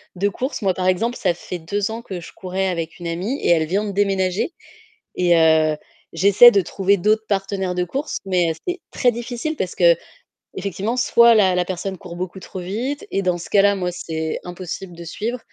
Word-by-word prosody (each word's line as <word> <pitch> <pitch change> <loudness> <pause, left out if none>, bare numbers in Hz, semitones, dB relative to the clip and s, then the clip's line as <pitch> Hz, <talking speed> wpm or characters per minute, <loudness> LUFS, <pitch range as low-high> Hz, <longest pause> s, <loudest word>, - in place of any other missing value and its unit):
de 200 +3 +1
course. 260 +4 -4
Moi, 190 -1 +2
par 185 0 -2
exemple, 230 +7 +1
ça 180 -3 +1
fait 175 0 -7
2 200 +6 -2
ans 230 +1 -5
que 185 -5 -6
je - - -11
courais 190 +1 -2
avec 170 -3 -3
une 175 - -8
amie 190 - -2
et - - 0
elle 160 -2 +4
vient 200 +5 0
de 205 - -3
déménager 195 - 0 0.6
et 175 -1 +4
heu, 160 -1 +4 0.4
j'essaie 200 +7 +7
de 200 - +4
trouver 195 +2 +1
d'autres 215 +4 +2
partenaires 195 -2 -1
de 180 - +1
course 275 - -3
mais 175 -3 +2
c'est 360 0 -2
très 245 - +3
difficile 245 +6 -4
parce 180 - -3 0.6
qu'effectivement, 200 +4 -4
soit 235 -1 +5
la 190 -4 +4
la 180 -1 +1
personne 190 +1 -4
court 175 -2 -10
beaucoup 185 +1 -5
trop 185 - -8
vite 240 +11 -3
et 195 - 0
dans 180 -1 +1
ce - - -9
cas-là, 200 0 +4
moi, 180 -2 -2
c'est 160 -2 -4
impossible 180 0 -7
de 170 - -9
suivre 230 +8 -4
190 Hz, 200 wpm, -21 LUFS, 175-210 Hz, 0.6 s, j'essaie